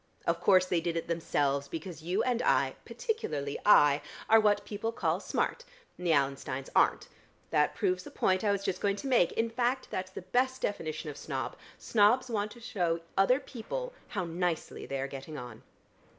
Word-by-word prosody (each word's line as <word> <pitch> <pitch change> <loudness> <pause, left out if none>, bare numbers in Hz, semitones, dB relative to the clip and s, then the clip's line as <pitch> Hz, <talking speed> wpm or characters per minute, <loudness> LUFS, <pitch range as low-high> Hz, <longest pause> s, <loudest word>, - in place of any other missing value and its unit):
Of 170 0 +1
course 185 0 +5
they 180 -2 0
did 170 0 -1
it 165 - -3
themselves, 145 -4 0
because 165 +1 -6
you 180 +7 0
and 245 -1 +1
I - - +2
particularly 290 - -3
I 145 -7 +7 0.3
are 225 - +7
what 205 -1 +2
people 210 +2 -3
call - - 0
smart, - - -1 0.3
and 180 - -5
the - - +4
Allensteins 135 -2 0
aren't. - - +3 0.4
That 150 -1 +2
proves 185 -3 0
the - - -10
point 185 +1 +1
I 205 - +3
was 200 -1 -1
just 185 -2 -2
going 200 -1 +2
to 205 - -8
make: 240 -10 +4
in 225 0 0
fact, 250 +2 0
that's 185 0 -3
the 190 - -8
best 255 +7 +1
definition 155 -5 -3
of 145 - -11
snob. 135 -5 -4 0.2
Snobs 235 +4 +3
want 210 -1 0
to 240 - -14
show 175 -8 -1
other 195 +8 +4
people - - -6
how 200 -5 -3
nicely 170 0 -2
they 135 - -3
are 135 - -2
getting 140 +3 -8
on." 120 -3 -8
185 Hz, 190 wpm, -30 LUFS, 155-225 Hz, 0.4 s, I